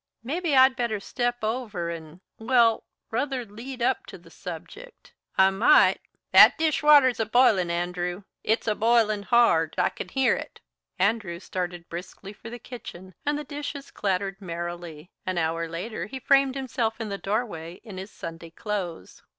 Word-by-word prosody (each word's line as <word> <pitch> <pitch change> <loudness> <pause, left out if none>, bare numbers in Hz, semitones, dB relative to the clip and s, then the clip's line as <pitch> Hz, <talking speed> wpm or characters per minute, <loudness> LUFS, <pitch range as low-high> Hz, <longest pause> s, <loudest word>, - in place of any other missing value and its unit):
Maybe 310 +4 -1
I'd 260 0 +6
better 235 -5 -1
step 240 +3 -2
over 215 -7 -2
and 165 +1 -9 0.2
well 230 -1 +3 0.3
ruther 255 +1 -1
lead 235 +4 -7
up - - 0
to - - -9
the - - -18
subject. - - -10 0.2
I 190 0 +6
might 195 +4 +5 0.2
" - - -59
"That - - +9
dish 315 -2 +1
water's 290 -5 +6
a 225 - +1
b'ilin', 220 -7 +4
Andrew. 175 +2 -2 0.2
It's 220 +1 0
a 215 - +3
b'ilin' 215 -2 +2
hard. 200 -10 +3
I - - +3
c'n - - -8
hear 265 -1 +2
it." - - -8 0.4
Andrew 195 -3 0
started 175 -2 -5
briskly 185 +3 -8
for 225 - -11
the 240 - -7
kitchen, 190 -6 -10
and 290 0 +1
the 300 - -4
dishes 285 -1 -7
clattered 195 0 -2
merrily. 170 -2 -6 0.2
An 185 -1 -1
hour 165 0 -1
later 185 +7 -5
he 265 - -7
framed 275 0 +3
himself 240 -4 -2
in 225 -2 -4
the 200 0 -4
doorway 195 -6 -3
in 205 -5 -8
his 190 +2 -7
Sunday 165 -4 -8
clothes. 180 - -5
215 Hz, 165 wpm, -26 LUFS, 175-245 Hz, 0.4 s, That